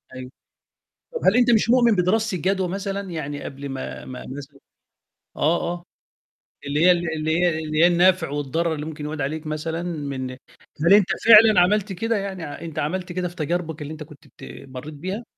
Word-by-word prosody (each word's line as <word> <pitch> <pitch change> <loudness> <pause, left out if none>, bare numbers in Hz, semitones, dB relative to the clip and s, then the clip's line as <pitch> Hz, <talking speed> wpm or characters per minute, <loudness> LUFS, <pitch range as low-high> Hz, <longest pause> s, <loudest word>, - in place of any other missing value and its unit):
أيوه. 130 0 -8 0.8
طَب 470 - -3
هل 195 - +5
أنت 245 0 +4
مش 225 -1 +3
مؤمن 240 -3 +4
بدراسة 200 +3 +1
الجدوى 190 +2 0
مثلًا؟ 195 +1 -4
يعني 145 -3 -5
قبل 140 +1 -7
ما 135 -1 -6
ما 130 -1 -8
مثلًا 140 0 -11 0.8
آه، 165 +3 +2
آه. 175 -1 -8 0.8
اللي 150 +4 +1
هي 180 - +8
ال 175 -2 0
اللي 160 +1 0
هي 175 -3 +1
اللي 155 -1 -3
هي - - +8
النفع 175 -1 +3
والضرر 145 +4 -1
اللي 150 0 -5
ممكن 155 -1 -7
يعود 150 0 -4
عليك 155 +3 -3
مثلًا 160 +2 -3
من 140 -6 -4 0.5
هل 170 +5 +5
أنت 205 -3 +4 0.2
فعلًا 220 -3 +8
عملت 200 +2 +1
كده 225 +5 -1
يعني، 195 -3 -5
أ - - -10
أنت 165 -3 -6
عملت 180 +4 -3
كده 180 0 -2
في 175 - -11
تجاربك 165 -1 -3
اللي 145 +1 -6
أنت 155 0 -8
كنت 150 -2 -16
بت 65 0 -12
مرّيت 130 +4 -8
بيها؟ 185 +10 -5
170 Hz, 190 wpm, -23 LUFS, 150-190 Hz, 0.8 s, هي